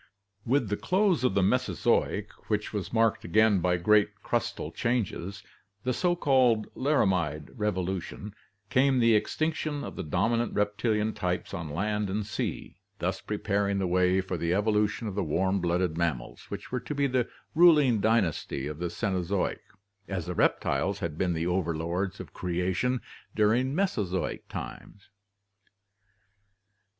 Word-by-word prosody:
With 125 -3 +2
the 105 - 0
close 185 - +2
of 115 -6 +2
the 100 - +3
Mesozoic, 120 -2 +1 0.2
which 105 0 -1
was 100 -4 -3
marked 115 -1 +2
again 105 +2 +4
by 90 0 +1
great 105 +4 +2
crustal - - -2
changes, 100 -5 -2 0.4
the 125 - 0
so 175 +6 +1
called 130 -8 +3
Laramide 90 - +1
revolution, 95 0 -3 0.4
came 135 0 +4
the 115 -2 +5
ex 105 - 0
tinction 155 -2 -1
of - - -7
the - - -4
dominant 115 +9 0
reptilian 105 +1 0
types 90 -1 -3
on 80 -3 -4
land 105 +6 -1
and 105 +2 -2
sea, 110 - -4 0.2
thus - - -2
pre 105 - -3
paring 100 -1 0
the 95 - 0
way 90 +1 +3
for 95 -1 -4
the 85 +2 0
evolution 105 +2 +1
of 100 - -4
the 100 0 -1
warm 95 +5 +1
blooded 85 -1 0
mammals, 85 -2 -2
which - - -7
were 125 - -1
to 135 +4 -6
be 140 0 +2
the 130 -3 0 0.2
ruling 150 -8 +6
dynasty 100 - +1
of 75 +1 -5
the 85 0 -2
Cenozoic 95 0 -1 0.5
as 95 -4 -3
the 90 - -3
reptiles 100 +3 +1
had 85 -6 -4
been 90 +1 0
the 80 0 -2
overlords 90 +1 -1
of - - -9
creation 90 +8 -1 0.3
during 120 +6 +2
Mesozoic 105 - -1
times. 100 - -8
105 Hz, 150 wpm, -28 LUFS, 90-120 Hz, 0.5 s, ruling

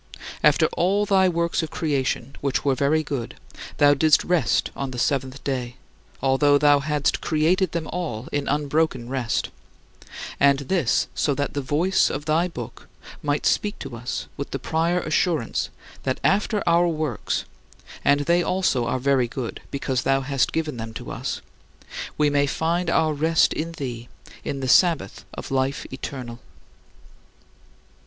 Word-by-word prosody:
After - - +5
all 200 +4 +2
thy 190 -2 +4
works 170 -1 0
of 160 - -4
creation, 140 -5 -2
which 140 0 -1
were 140 - +3
very 145 +4 +2
good, 135 -6 -4 0.4
thou 145 0 +6
didst 150 +1 +4
rest 180 -2 +1
on 140 - -3
the 125 - -7
seventh 130 +1 -1
day, 125 -3 -3 0.5
although 145 +2 +4
thou 145 0 +5
hadst 150 0 0
created 165 +3 +2
them 170 -2 -2
all 150 -10 -4
in 145 -1 -1
unbroken 145 -4 0
rest 130 -3 -1 0.9
and 140 -1 +5
this 140 -1 +1
so 145 - 0
that 145 +1 -2
the 145 - -2
voice 160 +8 +2
of 145 +1 -4
thy 160 +3 +2
Book 120 -10 -8 0.3
might 145 0 -1
speak 210 +1 +1
to 135 -4 -7
us 120 +1 -4
with 140 - -4
the - - -3
prior 165 +6 0
assurance 155 -5 0 0.3
that 130 - -2
after 205 +1 +2
our 170 +1 +4
works 155 -9 -2 0.6
and 145 +1 +4
they 170 +4 +3
also 175 -10 +1
are 130 - 0
very 130 -1 +2
good 120 -1 -5
because 130 -2 -1
thou 135 0 +2
hast 135 -1 0
given 155 -5 -2
them 115 0 -6
to - - -6
us - - -4 0.8
we 150 - +3
may 145 0 +2
find 170 +4 0
our 160 -2 +2
rest 160 +2 +3
in 165 +2 -3
thee 120 -6 -6 0.3
in 135 -1 -4
the 130 - -2
Sabbath 170 +3 +3
of - - -7
life 135 0 0
eternal. 125 -3 -6
145 Hz, 155 wpm, -24 LUFS, 130-165 Hz, 0.9 s, thou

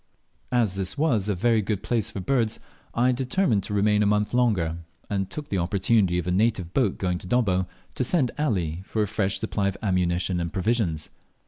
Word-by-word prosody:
As 120 -6 +2
this 95 +6 -3
was 120 -10 +1
a 100 - +1
very 115 +4 +2
good 105 -1 -2
place 115 -4 0
for - - -6
birds, 115 +2 0 0.4
I 125 +2 +3
determined 125 - +1
to - - -5
remain 105 +1 +3
a 105 - +3
month 105 +1 +1
longer, 100 -10 +2 0.3
and 95 -2 -1
took 150 -1 -6
the 95 - 0
opportunity 95 +1 +2
of 90 - -1
a 90 - -1
native 95 -3 +1
boat 120 -8 +1
going 90 -2 -1
to 90 - -10
Dobbo, 95 -6 +1 0.3
to - - -1
send 130 -1 +2
Ali 90 - 0
for 110 +2 -1
a - - -1
fresh 100 0 -1
supply 105 -2 -1
of 100 - -2
ammunition 90 -2 +1
and 85 -1 -2
provisions. 95 -6 0
105 Hz, 200 wpm, -25 LUFS, 90-115 Hz, 0.4 s, I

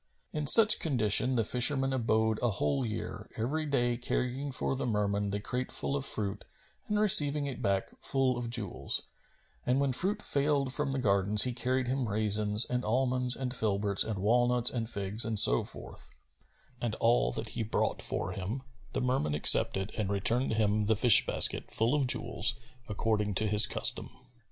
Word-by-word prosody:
In 150 -1 -5
such 220 +6 +7
condition 125 -3 +2
the 115 - 0
fisherman 135 +4 +2
abode 110 -3 -1
a 120 - 0
whole 135 +6 -2
year, 110 -1 -7
every 150 +8 -4
day 120 -4 -2
carrying 125 +3 -4
for 135 - -4
the 130 - -5
Merman 105 -2 -3
the 100 +1 -4
crate 125 +5 -6
full 140 - -4
of 140 - -4
fruit 100 -5 -3 0.4
and 210 0 -2
receiving 150 -8 +4
it 135 -3 -8
back, 100 -1 -3
full 135 -2 -1
of 120 -1 -6
jewels; 100 - -3 0.6
and 125 +2 -1
when 140 -2 -1
fruit 200 - -3
failed 140 -2 -2
from 150 0 -3
the 135 - -4
gardens, 100 -3 +3
he 125 - -1
carried 130 +1 -3
him 130 -2 -3
raisins 105 +1 +3
and 125 0 -4
almonds 125 +2 0
and 130 -2 -6
filberts 100 -2 -1
and 110 -2 -6
walnuts 120 +4 +1
and 115 -3 -5
figs 100 +1 -3
and 110 -2 +1
so 60 - +6
forth; - - -9 0.7
and 115 -3 -4
all 115 - 0
that - - -3
he - - -6
brought 110 0 -3
for 90 - -1
him 100 +8 -7 0.3
the - - -3
Merman 125 - -2
accepted 95 +6 +3
and 105 -3 -4
returned 115 +5 0
him 105 -1 -1
the 110 - +1
fish 115 +2 +7
basket - - +3
full 115 +4 0
of 145 -3 -1
jewels 120 -1 +1 0.3
according 105 -1 -3
to 110 - +1
his 105 0 +5
custom. - - +1
120 Hz, 175 wpm, -28 LUFS, 105-130 Hz, 0.7 s, such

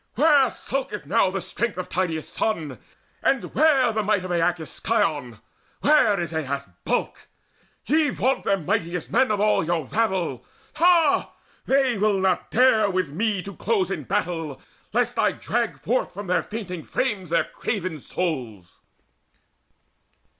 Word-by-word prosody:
Where 285 -1 +5
skulketh 260 - -4
now 195 +5 +3
the 195 +1 -3
strength 230 0 -2
of 185 - -4
Tydeus' 165 -4 -2
son, 155 - -2 0.4
And 270 -3 0
where 275 -6 +4
the 215 - 0
might 205 -3 0
of 185 - -5
Aeacus' 170 -2 0
scion? 155 - 0 0.4
Where 280 -9 +4
is 170 -1 -3
Aias' 140 -4 -3 0.2
bulk? - - -2 0.6
Ye 305 +1 +3
vaunt 265 0 0
them 195 -5 0
mightiest 170 +2 -2
men 260 +1 +3
Of 210 -2 0
all 210 -3 +3
your 165 -2 -1
rabble. 190 - -1 0.3
Ha! 335 -3 +3 0.3
they 265 -5 +2
will 205 -1 +2
not 190 -1 0
dare 225 -3 +4
With 185 -6 -1
me 200 +3 -1
to 200 -1 -8
close 195 -1 0
in 155 -7 -4
battle, 165 -4 -2 0.3
lest - - 0
I - - +3
drag - - -2
Forth - - -1
from 205 - -6
their 180 0 +1
fainting 195 -6 -6
frames 205 -3 -2
their 170 - +2
craven 185 -8 -4
souls!" 125 - -4
195 Hz, 145 wpm, -24 LUFS, 165-230 Hz, 0.6 s, Where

